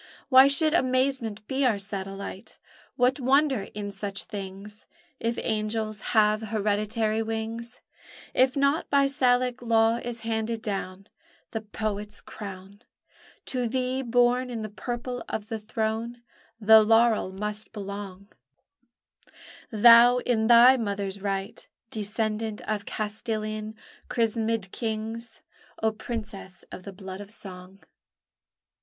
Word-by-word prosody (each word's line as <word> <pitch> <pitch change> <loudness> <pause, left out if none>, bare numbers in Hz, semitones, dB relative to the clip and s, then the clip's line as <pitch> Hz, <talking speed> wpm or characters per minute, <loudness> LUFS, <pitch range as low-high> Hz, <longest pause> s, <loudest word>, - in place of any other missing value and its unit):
Why 260 0 +8
should 305 +3 +4
amazement 255 -7 0
be 270 +1 0
our 240 -5 +3
satellite? 195 -1 -6 0.4
What 250 +2 +2
wonder 265 -4 +2
in 205 -1 -4
such 200 0 -2
things? 200 +1 -7 0.3
If 230 +1 -1
angels 215 -1 -2 0.2
have 215 0 +4
hereditary 215 +1 0
wings, 225 +1 -4 0.5
If 260 +2 +3
not 280 +3 +1
by 280 -1 +4
Salic 250 -2 +1
law 225 -1 +3
is 240 -1 -5
handed 225 0 -2
down 195 -2 -4 0.5
The 225 - -3
poet's 210 0 -4
crown, 200 0 -10 0.6
To 250 -2 -1
thee, 255 +2 -1
born 245 +1 +2
in 230 -3 -4
the 215 - -5
purple 240 +3 -5
of 215 0 -4
the 225 -2 -3
throne, 220 +2 -3 0.4
The 220 0 +8
laurel 225 -2 +3
must 210 +2 -4
belong: 200 -2 -7 1.4
Thou, 235 +2 +7
in 235 -3 +1
thy 240 +2 +8
mother's 200 -3 -3
right 195 -1 -4 0.2
Descendant 215 0 -2
of 215 +1 -3
Castilian 215 -1 -4 0.3
chrismèd 225 -3 0
kings 225 0 -5 0.4
O 220 - +3
Princess 215 -4 -7
of 185 - -9
the 200 - -6
Blood 190 +1 -8
of 200 - -10
Song! 190 -2 -11
220 Hz, 120 wpm, -26 LUFS, 205-240 Hz, 1.4 s, Why